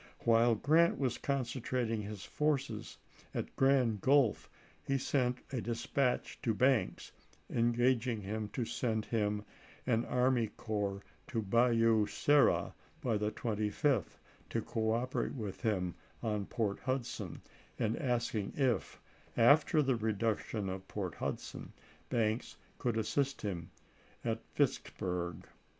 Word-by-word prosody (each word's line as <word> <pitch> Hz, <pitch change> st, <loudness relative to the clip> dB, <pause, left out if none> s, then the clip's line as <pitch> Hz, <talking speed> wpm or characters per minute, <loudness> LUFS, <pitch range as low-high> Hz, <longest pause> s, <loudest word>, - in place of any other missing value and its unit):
While 115 Hz, 0 st, +4 dB
Grant 160 Hz, +9 st, +4 dB
was 130 Hz, -4 st, -1 dB
con 140 Hz, -2 st, 0 dB
centrating 120 Hz, -2 st, -2 dB
his 105 Hz, -1 st, -6 dB
forces 140 Hz, -7 st, -1 dB, 0.4 s
at -, -, -3 dB
Grand 130 Hz, -6 st, +3 dB
Gulf, 135 Hz, -4 st, +3 dB, 0.3 s
he 135 Hz, -, 0 dB
sent 125 Hz, -2 st, +1 dB
a 130 Hz, -3 st, -1 dB
dis 115 Hz, +1 st, -3 dB
patch 130 Hz, -3 st, 0 dB
to 115 Hz, -3 st, 0 dB
Banks, 130 Hz, +1 st, +2 dB, 0.4 s
engaging 115 Hz, -3 st, +1 dB
to 120 Hz, -, -2 dB
send 110 Hz, -2 st, -1 dB
him 105 Hz, -2 st, 0 dB, 0.4 s
an 115 Hz, -2 st, +2 dB
army 125 Hz, -2 st, +2 dB
corps 100 Hz, -3 st, -2 dB, 0.2 s
to 115 Hz, -7 st, -2 dB
Bayou 115 Hz, 0 st, +4 dB
Sara 145 Hz, -1 st, +3 dB, 0.3 s
by 120 Hz, -4 st, +1 dB
the 105 Hz, 0 st, 0 dB
25th, 110 Hz, -, 0 dB, 0.3 s
to -, -, 0 dB
cooperate 115 Hz, +5 st, -1 dB
with 105 Hz, -6 st, -5 dB
him 95 Hz, -7 st, 0 dB, 0.3 s
on 105 Hz, -3 st, -1 dB
Port 110 Hz, -4 st, -1 dB
Hudson, 120 Hz, -9 st, -3 dB, 0.4 s
and 110 Hz, +1 st, +1 dB
asking 120 Hz, -7 st, -1 dB
if, 130 Hz, -8 st, 0 dB, 0.4 s
after 150 Hz, +6 st, +6 dB
the 135 Hz, -1 st, +2 dB
reduc 110 Hz, -1 st, 0 dB
tion 105 Hz, -3 st, -4 dB
of 95 Hz, 0 st, -5 dB
Port 95 Hz, -5 st, -3 dB
Hudson, -, -, -5 dB, 0.4 s
Banks 110 Hz, 0 st, 0 dB, 0.2 s
could 120 Hz, -3 st, 0 dB
assist 135 Hz, +5 st, 0 dB
him 90 Hz, -5 st, -3 dB, 0.6 s
at 115 Hz, -1 st, -1 dB
Vicksburg. 90 Hz, -, -1 dB
115 Hz, 125 wpm, -34 LUFS, 105-130 Hz, 0.6 s, after